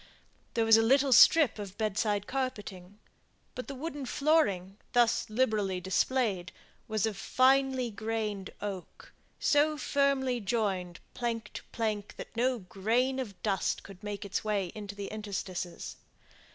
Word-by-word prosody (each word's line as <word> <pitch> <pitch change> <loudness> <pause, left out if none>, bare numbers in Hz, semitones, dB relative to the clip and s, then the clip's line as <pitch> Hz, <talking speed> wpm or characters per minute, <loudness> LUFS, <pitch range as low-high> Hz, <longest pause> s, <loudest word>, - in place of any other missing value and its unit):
There 230 -1 +2
was 225 0 +7
a - - +5
little 270 +3 +4
strip 290 -4 +7
of 200 -1 -7
bedside 210 -1 0
carpeting, 205 -8 -4 0.6
but 255 - -6
the 275 - -6
wooden 290 -1 -5
flooring, 205 - +1 0.2
thus 240 -2 +3
liberally 215 -5 +1
displayed, 190 0 0 0.4
was 215 -1 0
of 220 -2 -2
finely 260 +2 +2
grained 215 -2 -3
oak, 195 -3 -7 0.3
so 300 +1 +3
firmly 275 -3 +1
joined, 195 -5 -1
plank 230 -3 -3
to - - -7
plank, 215 -3 -3
that - - -9
no 250 +2 +2
grain 230 +7 0
of 215 -7 -5
dust 195 -4 0
could 195 -2 -12
make 205 -1 -5
its 200 - -2
way 200 -5 -1
into 205 -2 -7
the 200 0 -5
interstices. 190 -4 -5
220 Hz, 140 wpm, -30 LUFS, 200-255 Hz, 0.6 s, was